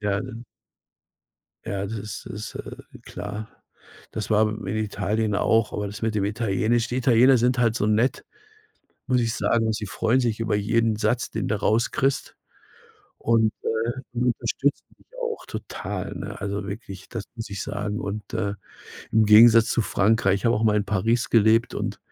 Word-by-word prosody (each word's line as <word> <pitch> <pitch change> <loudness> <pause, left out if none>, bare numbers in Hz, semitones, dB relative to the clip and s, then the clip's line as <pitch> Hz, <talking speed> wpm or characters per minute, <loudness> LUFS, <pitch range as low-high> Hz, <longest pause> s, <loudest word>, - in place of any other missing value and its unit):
Ja, 100 -1 0
ne? 115 +2 -8 1.2
Ja, 100 -1 -3
das 105 - -6
ist 105 -1 -6
ist, 105 +1 -7
äh, - - -7 0.3
klar. 105 +1 -6 0.6
Das 110 - -4
war 110 0 +4
in 110 0 -6
Italien 105 0 -1
auch, 110 +1 +2
aber 105 - -2
das 100 +1 -8
mit 110 -1 -1
dem 100 -2 +1
Italienisch 110 +2 0
die 125 - -3
Italiener 130 +1 +5
sind 125 +1 +2
halt 115 -2 +2
so 105 - 0
nett, 110 +5 +1 0.8
muss 125 -2 +2
ich 115 -1 0
sagen. 115 -2 +1
Sie 105 0 -3
freuen 115 +6 +1
sich 115 -4 0
über 110 -2 0
jeden 110 +2 +1
Satz, 110 +3 0
den - - -3
du 110 - 0
rauskriegst 115 +5 0 0.8
und, 110 -1 +2
äh, 115 - -1 0.4
die 120 - -3
unterstützen 130 +3 0
dich - - -26 0.2
auch 470 -2 -3
total, - - -5
ne? - - -6
Also 100 0 -3
wirklich, 100 -2 -8
das 115 -4 -5
muss 115 -2 -6
ich 100 -1 -5
sagen 105 +1 -3
und, 105 +1 -5
äh 100 0 -1 0.6
im 110 0 +4
Gegensatz 115 +2 +8
zu 115 - +1
Frankreich, 100 0 +2
ich 100 - -4
habe 115 - +4
auch 105 - 0
mal 105 -1 +3
in 105 - 0
Paris 110 +4 0
gelebt 115 +1 +4
und - - -3
110 Hz, 175 wpm, -24 LUFS, 105-115 Hz, 1.2 s, Gegensatz